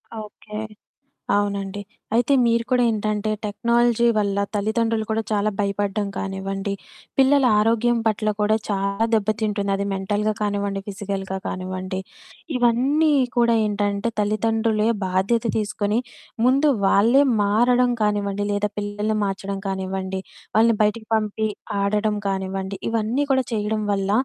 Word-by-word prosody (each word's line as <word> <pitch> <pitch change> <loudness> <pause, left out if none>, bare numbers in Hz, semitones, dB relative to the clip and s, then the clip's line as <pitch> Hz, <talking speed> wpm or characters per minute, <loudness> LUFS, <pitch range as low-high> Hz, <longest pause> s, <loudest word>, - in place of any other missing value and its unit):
ఆ! - - -7
ఓకే. 210 0 -10 0.8
అవునండి. 200 -1 -2 0.3
అయితే 245 +4 +3
మీరు 230 0 +2
కూడా 250 -1 +3
ఏంటంటే, 215 0 -1
టెక్నాలజీ 235 +2 +2
వల్ల 200 -1 0 0.2
తల్లిదండ్రులు 220 +1 0
కూడా 220 +1 0
చాలా 210 0 +1
భయపడ్డం 200 +1 -1
కానివ్వండి, 195 +1 -3 0.4
పిల్లల 270 +1 +5 0.2
ఆరోగ్యం 230 +2 +2
పట్ల 215 0 +1
కూడా 215 +1 +3
చాలా 200 +2 0
దెబ్బతింటుంది, 215 -1 0
అది 200 - -2
మెంటల్‌గా 205 +3 0
కానివ్వండి, 200 -1 -1
ఫిజికల్‌గా 195 -1 -4
కానివ్వండి, 185 0 -4 0.6
ఇవన్నీ 260 +6 +3 0.3
కూడా 235 -1 +4
ఏంటంటే, 205 +1 -1
తల్లిదండ్రులే 220 +1 +1 0.2
బాధ్యత 195 +5 +1 0.2
తీసుకొని, 210 +1 -1 0.5
ముందు 275 +4 +4 0.2
వాళ్ళే 230 +8 +5 0.2
మారడం 245 +5 +3
కానివ్వండి, 205 -1 0
లేదా 205 0 0
పిల్లల్ని 205 +1 -2
మార్చడం 195 0 -3
కానివ్వండి, 190 0 -3 0.4
వాళ్ళని 225 0 +5
బయటకి 220 +1 -1
పంపి, 215 0 -1 0.3
ఆడడం 210 +1 +1
కానివ్వండి, 190 0 -3
ఇవన్నీ 230 +5 0
కూడా 260 -1 +2
చేయడం 215 0 -1
వల్ల, 195 0 -1
210 Hz, 120 wpm, -22 LUFS, 200-225 Hz, 0.8 s, పిల్లల